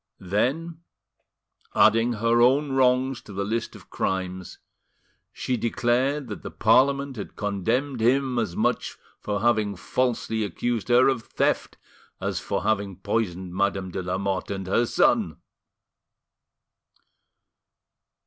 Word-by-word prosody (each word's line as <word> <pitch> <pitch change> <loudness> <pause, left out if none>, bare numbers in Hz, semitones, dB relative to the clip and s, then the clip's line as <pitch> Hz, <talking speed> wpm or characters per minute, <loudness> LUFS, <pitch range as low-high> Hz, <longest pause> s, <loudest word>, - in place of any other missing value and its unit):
Then, 140 - -1 1.0
adding 115 +2 +4
her 115 +2 +2
own 135 +4 +4
wrongs 130 -1 +2
to 100 - -12
the 100 +1 -2
list 115 +2 -3
of - - -15
crimes, 95 -1 -3 0.7
she 125 - -2
declared 125 +5 0
that - - -6
the - - -6
Parliament 140 0 +2
had 100 - -7
condemned 115 +6 -1
him 130 +1 +2
as 100 -7 -2
much - - -1 0.2
for 105 -1 -3
having 110 -3 +2
falsely 115 +2 -1
accused 115 +2 -2
her 125 +1 +5
of 135 -4 +1
theft - - -1 0.4
as - - -2
for - - -3
having 100 -3 0
poisoned 95 -2 -2
Madame 95 -1 -1
de 95 - -3
Lamotte 95 +2 -2
and 95 -1 -4
her 115 +6 +1
son! - - +2
115 Hz, 120 wpm, -25 LUFS, 100-130 Hz, 1.0 s, her